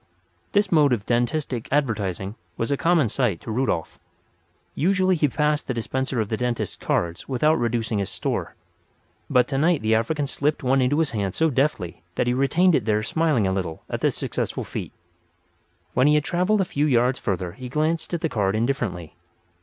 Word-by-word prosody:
This 205 +1 +2
mode 150 -5 +5
of 105 -4 -2
dentistic 120 0 -1
advertising 105 -9 -1 0.2
was 115 - -1
a - - +3
common 165 -2 +3
sight 110 -6 0
to 115 - -6
Rudolf. 110 -8 -1 0.7
Usually 185 +2 +2
he 150 -2 +2
passed 150 +2 0
the 130 - -2
dispenser 130 +2 -2
of 110 - 0
the 110 - -1
dentist's 125 0 -2
cards 85 +6 -2
without 150 +5 +2
reducing 115 -2 0
his 100 - -2
store; - - -3 0.7
but 125 -1 +4
tonight 150 +1 +1
the 110 +1 +2
African 140 +7 +1
slipped 145 +2 -1
one 130 +1 +3
into 130 +3 +2
his 160 -2 +1
hand 100 -4 -2
so 160 -1 +2
deftly 130 - -1
that - - +1
he 120 - +1
retained 160 +8 +3
it 125 -8 +2
there 105 -1 +1
smiling 150 -3 +1
a 95 - +1
little 90 -4 -4
at - - -3
the - - +3
successful - - -3
feat. - - -6 1.0
When 130 +3 +4
he 150 - +5
had 150 - +2
travelled 185 +6 +1
a - - +1
few 150 -2 0
yards 125 -1 +2
further 90 -3 -2
he 125 +7 -9
glanced 155 +4 -1
at 165 - -4
the - - +1
card 105 -7 0
indifferently. 110 - -2
130 Hz, 185 wpm, -24 LUFS, 110-150 Hz, 1.0 s, mode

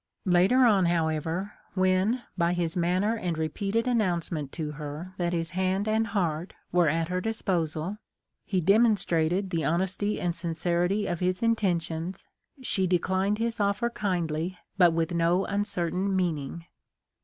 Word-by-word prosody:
Later 190 +8 +5
on, 200 -6 +4
however, 165 +3 -1 0.2
when 185 +6 +2
by 170 -1 +1
his 170 -2 -1
manner 185 +5 +1
and 175 -7 -2
repeated 195 +8 -1
announcement 175 - 0
to 155 -3 -3
her 150 +4 -7
that 175 -1 0
his 165 -1 -2
hand 190 +3 0
and 220 +1 +1
heart 175 -5 -2 0.2
were 175 -3 +4
at 165 +2 0
her 180 0 -1
disposal, 180 -3 -2 0.4
he 185 -3 -1
demon 215 +6 +5
strated 175 +2 0
the 165 -2 0
honesty 185 +6 0
and 175 -1 0
sincerity 175 +4 0
of 175 -2 -2
his 185 +3 0
intentions, 180 -5 -1 0.4
she 190 -6 +1
declined 190 +3 +1
his 230 0 -2
offer 205 +4 +1
kindly 175 -4 -2 0.2
but 180 -3 +6
with 165 +1 -1
no 170 +3 +2
uncertain 195 -2 -1
meaning. 165 -3 -2
180 Hz, 145 wpm, -27 LUFS, 165-200 Hz, 0.4 s, but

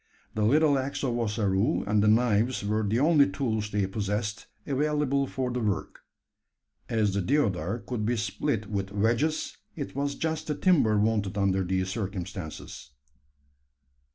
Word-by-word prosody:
The 110 - -2
little 145 +4 +4
axe 135 +2 -3
of 120 -3 0
Ossaroo 105 +2 +1
and 105 0 +2
the 105 - +3
knives 115 +1 +2
were 105 +1 +1
the 110 +2 0
only 145 -1 +5
tools 110 -7 -2
they 105 -1 0
possessed 105 +1 -3 0.2
available 140 -1 +1
for 130 -1 -2
the 125 - -2
work. 105 -4 -2 0.9
As 110 -3 +1
the 100 - 0
deodar 100 - +1
could 120 -4 -3
be 120 +3 0
split 110 +1 -1
with 100 -2 -3
wedges, 115 +10 0 0.2
it 140 -5 -6
was 140 0 -1
just 160 0 -2
the 150 - -1
timber 140 - +3
wanted 105 -2 +1
under 95 -1 +2
these 95 +1 -1
circumstances. 95 - -6
110 Hz, 150 wpm, -28 LUFS, 100-140 Hz, 0.9 s, only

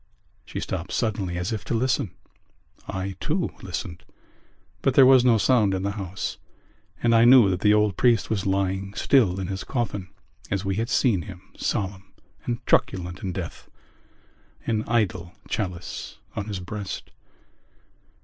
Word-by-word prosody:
She - - -5
stopped 95 0 -4
suddenly 100 -6 -1
as 90 +5 -2
if 105 -5 -4
to - - -1
listen. 125 -3 +1 0.8
I 95 0 -4
too 170 +4 -1
listened; 90 -2 -5 0.8
but 135 - +1
there 135 - +9
was 130 -1 +7
no 120 -3 +5
sound 110 -4 +3
in 95 - -3
the 100 - 0
house: 100 -2 -5 0.6
and 120 -1 +4
I 115 0 +6
knew 120 -5 +7
that 90 - -1
the 105 +1 +4
old 105 -3 +2
priest 120 -4 +3
was 100 -3 -1
lying 95 +1 -1
still 105 -9 +3
in 95 - -2
his 95 +1 -4
coffin 105 -7 -3 0.4
as 100 0 -1
we 95 0 -1
had 115 +2 -1
seen 110 -9 +3
him, 95 -1 -11
solemn 95 -1 -3 0.3
and 120 -1 -3
truculent 90 -1 +1
in 95 - -3
death, 90 -2 -6 1.0
an 110 -2 0
idle 95 -7 0
chalice 90 -4 -4 0.2
on 100 - -3
his 100 -3 -4
breast. 100 +2 -6
100 Hz, 155 wpm, -25 LUFS, 95-115 Hz, 1.0 s, there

